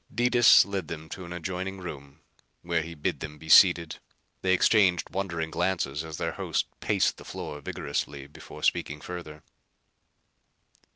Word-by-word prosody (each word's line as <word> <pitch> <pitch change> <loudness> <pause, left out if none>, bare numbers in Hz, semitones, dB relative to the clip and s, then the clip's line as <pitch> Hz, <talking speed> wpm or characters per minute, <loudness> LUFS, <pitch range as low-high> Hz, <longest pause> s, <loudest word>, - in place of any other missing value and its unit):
Detis 120 0 +6
led 95 -4 -4
them 80 -1 -7
to 95 - -7
an 85 - -10
adjoining 95 +2 -4
room 70 -6 -9 0.4
where 85 -1 0
he 85 +1 -8
bid 75 - -2
them 75 -1 -7
be 80 - -13
seated. 85 -1 +6 0.4
They 95 - +1
exchanged 95 -3 +3
wondering 85 -4 -3
glances 85 -4 -1
as 80 -2 -7
their - - -2
host - - -1
paced - - +1
the - - -12
floor 75 0 -7
vigorously 70 0 -4
before 70 - -12
speaking 75 +1 0
further. 75 -3 -8
85 Hz, 150 wpm, -27 LUFS, 75-95 Hz, 0.4 s, Detis